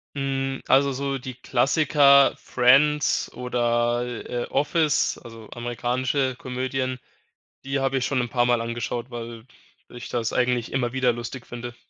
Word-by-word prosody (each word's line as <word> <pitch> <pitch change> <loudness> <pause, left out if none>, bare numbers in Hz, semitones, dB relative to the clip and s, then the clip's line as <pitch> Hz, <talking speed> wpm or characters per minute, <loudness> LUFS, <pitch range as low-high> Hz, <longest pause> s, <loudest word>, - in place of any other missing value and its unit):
Hm, 135 -1 -2
also, 140 +1 +4
so 135 +1 -2
die 130 -1 -8
Klassiker 140 +2 +4
„Friends“ 140 +4 +3
oder, 120 -1 0
äh, 120 0 -4
äh, - - -7
„Office“, 150 +1 +1
also, 115 -2 -12
amerikanische 125 +2 -1
Komödien, 130 0 -3 0.6
die 135 +1 -2
habe 135 0 0
ich 125 - 0
schon 135 - 0
'n 120 - -4
paarmal 120 -1 +2
angeschaut, 120 +1 -4
weil, 115 -1 -7 0.4
ich 120 - -9
das 115 -2 -2
eigentlich 125 -2 0
immer 125 -2 -1
wieder 130 -1 +1
lustig 120 +1 -7
finde. 120 0 -8
125 Hz, 140 wpm, -24 LUFS, 120-135 Hz, 0.6 s, also